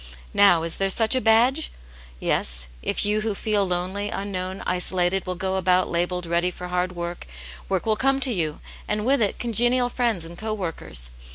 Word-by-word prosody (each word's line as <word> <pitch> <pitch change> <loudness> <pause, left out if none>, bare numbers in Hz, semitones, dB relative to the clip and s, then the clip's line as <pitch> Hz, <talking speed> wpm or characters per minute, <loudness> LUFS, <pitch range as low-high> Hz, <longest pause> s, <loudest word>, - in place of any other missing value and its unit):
Now, 195 -5 +6
is 165 - -1
there 195 0 +1
such 220 +4 +3
a 255 - +2
badge? 245 +7 +3 0.5
Yes, - - 0 0.2
if 65 - -1
you 210 +1 +1
who 215 -1 -2
feel 205 -1 0
lonely, 185 +3 -2
unknown, 190 -1 -4
isolated 180 +1 +1
will 180 - -2
go 190 +1 -1
about 185 0 +2
labelled 175 +1 -1
ready 170 +1 +1
for 180 0 -8
hard 180 0 -1
work, 170 0 -5 0.4
work 190 -2 -1
will 220 -1 +2
come 270 +4 +2
to 260 -3 +1
you, 160 -6 -2 0.3
and 210 0 -1
with 270 0 +3
it 205 - +1
congenial 240 +2 +2
friends 235 -9 0
and 170 +1 -10
co 220 0 -2
workers. 110 - -3
190 Hz, 185 wpm, -24 LUFS, 175-220 Hz, 0.5 s, Now